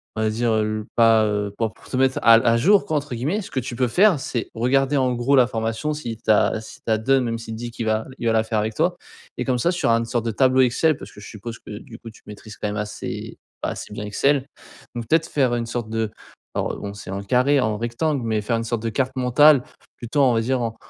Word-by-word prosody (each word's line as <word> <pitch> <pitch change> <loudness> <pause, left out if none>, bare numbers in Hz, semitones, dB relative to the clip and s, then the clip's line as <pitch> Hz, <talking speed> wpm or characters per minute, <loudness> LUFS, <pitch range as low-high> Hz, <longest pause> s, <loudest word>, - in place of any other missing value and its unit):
on 110 - -2
va 110 - +2
dire, 115 +2 0
heu, 110 0 -1
pas 115 -2 +5
heu, 105 -1 -2
pour 110 -2 -1 0.2
te 130 - -2
«mettre 130 0 +2
à 115 - +7
à 115 0 +3
jour», 195 - +4
quoi, 155 - 0
entre 145 -3 -4
guillemets. 150 - -1
Ce - - -9
que 130 - -1
tu 125 -1 -5
peux 125 +1 +1
faire, 180 - +4
c'est, 120 -3 -4
regarder 135 +4 +1
en 130 -2 +2
gros 120 +4 +2
la 125 -3 +5
formation, 115 +6 -2
si 120 -7 -5
tu - - -10
as 110 +1 +2
s'il 110 - -13
te - - -2
la 110 - +3
donne 135 +3 +2
même 115 -1 -2
s'il 115 -1 -7
dit 120 +1 -6
qu'il 115 0 -5
va 110 0 0
il 120 - -2
va 115 - +3
la 110 0 +3
faire 110 -1 -1
avec 110 +1 -2
toi, - - +1 0.4
et - - -2
comme 130 -1 +1
ça, 170 +9 +1
sur 175 -8 0
un 115 0 +4
une 115 - -2
sorte 115 0 -2
de - - 0
tableau 130 +4 +3
Excel, 140 +5 +3
parce - - -11
que - - -14
je 105 - -10
suppose 115 +2 -8
que 105 -1 -9
du 115 -1 -12
coup, 115 - -10
tu 110 - -19
maîtrises 105 +1 -10
quand - - -3
même 105 0 -3
assez 105 0 -5 0.3
bah, - - 0
assez - - -7
bien 105 - -5
Excel. 135 +6 +1 0.5
Donc, 120 -2 -5
peut-être 160 +5 +2
faire 130 -4 +1
une 120 -1 -3
sorte 120 -1 -4
de 110 -1 -1 0.5
bon, 100 0 -3
c'est 100 -2 -9
en 100 +1 -4
carré, 130 +7 +3
en 110 -3 0
rectangle, 120 +5 -1
mais 110 -1 0
faire 115 +3 -1
une 115 - -2
sorte 115 -1 -2
de 115 - -1
carte 130 +3 -1
mentale 130 +2 +5 0.3
plutôt, 125 +5 -1
on 130 -2 +4
va 115 - +2
dire, 130 +3 0
en 115 -1 -3
115 Hz, 270 wpm, -22 LUFS, 110-130 Hz, 0.5 s, à